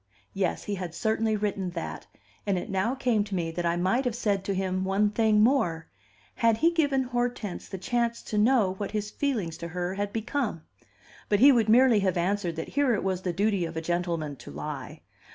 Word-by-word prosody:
Yes; 190 -2 -1
he 205 - -3
had 180 -4 -5
certainly 220 -1 +1
written 200 -3 -2
that, 170 -1 -6 0.4
and 195 -2 +2
it 200 +4 -5
now 195 +7 0
came 245 -5 +1
to 205 -2 -4
me 165 -2 -1
that 175 +1 -2
I 170 - +1
might 190 +9 +1
have 245 -3 -1
said 205 -5 0
to 200 - -1
him 185 0 -1
one 200 +2 +2
thing 215 -1 +3
more: 180 -10 +2 0.4
Had 230 -2 +2
he 330 +7 +3
given 285 -5 +2
Hortense 245 -5 -3
the 190 - -5
chance 235 +4 -1
to 210 - -2
know 215 -4 +3
what 205 - -2
his 210 -1 -3
feelings 220 - -2
to 170 - -6
her 180 +2 -3
had 200 +1 -3
become? 225 - -2 0.7
But 205 - +3
he 275 +5 +8
would 230 -4 +2
merely 240 -1 +6
have 190 -3 0
answered 180 -1 0
that 160 - -5
here 280 -4 +2
it - - -3
was 190 -1 -1
the 185 - -1
duty 200 +1 +1
of 165 -1 -5
a - - -1
gentleman 170 -4 -2
to - - -11
lie. 75 +1 -6
205 Hz, 210 wpm, -27 LUFS, 180-230 Hz, 0.7 s, he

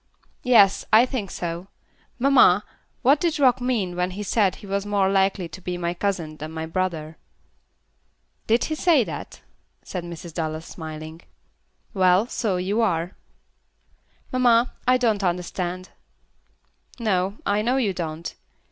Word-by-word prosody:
"Yes, 215 -6 +5
I 225 +3 +7
think 245 -7 -4
so. 175 +2 -5 0.5
Mamma, 245 -7 +5 0.4
what 275 +4 +5
did 335 -1 0
Rock 255 -3 +4
mean 220 -8 -1
when 180 0 0
he 210 - -3
said 200 -2 +2
he - - -13
was 200 0 -2
more 200 -2 +1
likely 195 -2 +1
to 165 +4 -10
be 180 0 -4
my 170 0 -2
cousin 170 -5 -3
than 155 +1 -6
my 160 0 -4
brother?" 160 -3 -3 1.3
"Did 230 +2 +3
he 315 - -2
say 310 -4 +3
that?" - - -8 0.4
said 180 -2 -5
Mrs. 170 -1 -8
Dallas, 160 -1 -3
smiling. 160 0 -8 0.7
"Well, 185 +1 +4
so 220 -6 -1
you 195 +5 0
are." 175 -4 0 1.2
"Mamma, 245 -1 +3
I 255 0 +5
don't 220 -5 +1
understand." 180 0 -2 1.1
"No. 195 -2 0
I 205 +1 +1
know 245 +4 +1
you 215 -7 +1
don't. 165 -1 -5
190 Hz, 140 wpm, -24 LUFS, 175-230 Hz, 1.3 s, I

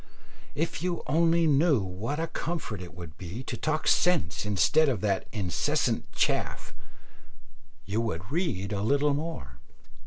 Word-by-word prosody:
If 160 -2 -2
you 175 -1 -2
only 165 +2 +3
knew 150 -2 +4
what 105 +11 -3
a 165 - +1
comfort 160 - -4
it 85 -2 -9
would 85 -3 -10
be 95 +8 -6
to 130 - -4
talk 155 +5 -1
sense 160 - +2
instead 105 - +4
of 115 -8 -1
that 100 -3 0
incessant 95 -6 0
chaff, - - -1 1.1
you 105 +4 0
would 95 -2 -4
read 125 - -1
a 100 - -1
little 140 +6 +3
more. 140 - -5
125 Hz, 145 wpm, -28 LUFS, 95-155 Hz, 1.1 s, knew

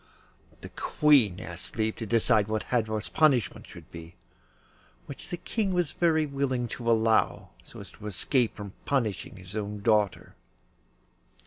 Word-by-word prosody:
The - - -8
Queen 130 -12 +3
asked 85 +5 -7
leave 110 0 0
to 115 - -5
decide 110 -1 +3
what 110 -2 -1
Hadvor's 110 -5 0
punishment 130 - +2
should - - -13
be, 85 +1 -10 0.9
which 140 - -9
the 175 - -3
King 200 0 -2
was 175 -5 +1
very 160 -2 +2
willing 135 -4 -1
to 115 0 -3
allow, 110 -1 +2
so - - -13
as - - -12
to 105 - -10
escape 120 +4 0
from 100 -2 -8
punishing 130 -2 -1
his 95 +1 -11
own 105 -1 -4
daughter. 105 -3 +1
110 Hz, 145 wpm, -28 LUFS, 105-135 Hz, 0.9 s, Queen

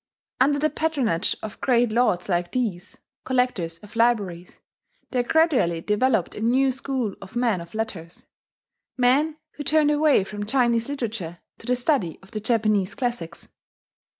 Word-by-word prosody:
Under 285 +3 +4
the 310 +2 +1
patronage 275 - 0
of 215 -1 -7
great 240 -3 +3
lords 215 -6 +1
like 175 -2 -1
these 205 -7 -3 0.3
collectors 250 -11 0
of 210 +2 -14
libraries 205 -7 0 0.5
there 250 - +2
gradually 255 - +2
developed 210 +2 +1
a - - -7
new 260 +4 +3
school 260 -5 -3
of 195 +4 -12
men 235 -7 +1
of 170 +4 -12
letters: 180 -7 -5 0.7
men 280 +5 +3 0.2
who 295 - -4
turned 300 0 +3
away 295 -7 +4
from 205 +1 -6
Chinese 240 -1 +2
literature 225 -11 -4 0.2
to 225 - -10
the 250 - +2
study 245 - 0
of 195 - -17
the 215 - -3
Japanese 215 -3 +1
classics. 235 -10 -4
230 Hz, 150 wpm, -24 LUFS, 195-260 Hz, 0.7 s, Under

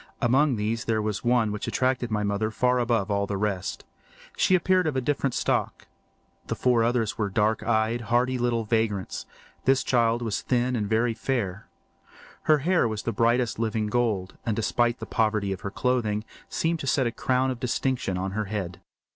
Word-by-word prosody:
Among 135 +2 +3
these 110 +2 -2
there 110 -1 +1
was 105 -2 -2
one 120 -3 +2
which 105 - -4
attracted 130 -2 0
my 105 -1 0
mother 100 +2 0
far 125 +3 +1
above 115 -4 0
all 100 0 0
the 100 - -2
rest. 95 -3 -2 0.5
She 185 - +3
appeared 185 0 +2
of 150 - -1
a - - +2
different 135 0 -1
stock. - - -1 0.6
The - - -2
four 125 -2 +2
others 115 -2 0
were 100 -2 0
dark 105 +2 +1
eyed, 110 +1 +1
hardy 120 +3 +1
little 120 -1 +1
vagrants; 110 -4 -1 0.4
this 130 0 +3
child 120 -1 +2
was 110 -4 -2
thin 125 0 0
and 105 -3 -2
very 115 +1 +2
fair. 110 -6 -3 0.8
Her 155 - +7
hair 175 -8 +3
was 110 -1 -4
the 115 - -2
brightest 120 +2 +1
living 110 -1 0
gold, 105 -4 -1
and 115 -3 -1
despite 120 +2 +1
the - - -6
poverty 110 -4 0
of 95 - -8
her 100 - -3
clothing, 110 -2 0 0.3
seemed 165 0 0
to 135 - -5
set 130 0 +2
a 120 - 0
crown 130 +2 0
of 125 - -5
distinction 125 -5 -1
on 95 +1 -2
her 110 +2 -2
head. 95 -4 -4
115 Hz, 190 wpm, -26 LUFS, 105-125 Hz, 0.8 s, Her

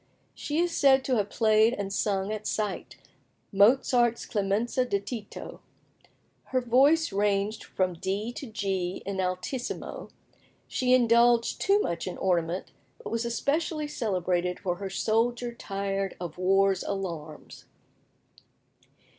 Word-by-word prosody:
She 295 - -4
is 345 0 +1
said 270 -2 +4
to 255 -3 +1
have 205 -1 0
played 220 0 +3
and 195 -1 -4
sung 195 -1 0
at 215 0 -5
sight 210 -3 -3 0.6
Mozart's 240 +3 +3
"Clemenza 210 +5 0
di 200 -5 0
Tito;" 210 0 -8 0.9
her 260 - 0
voice 270 +6 +3
ranged 205 +1 0
from 185 -1 -1
D 195 +6 -3
to 270 - -7
G 195 -4 -3
in 195 -1 -2
altissimo. 185 +8 -4 0.6
She 255 0 +2
indulged 235 -1 +3
too 400 +1 +4
much 170 - -3
in 180 - -5
ornament, 175 -1 -1 0.3
but 475 - -8
was 230 +1 -1
especially 300 +6 -1
celebrated 180 - -1
for 180 -3 -2
her 195 0 -5
"Soldier 235 +3 0
tired 195 -3 -3
of 175 -1 -7
War's 195 0 +3
Alarms." 170 -6 -6
210 Hz, 125 wpm, -27 LUFS, 190-245 Hz, 0.9 s, said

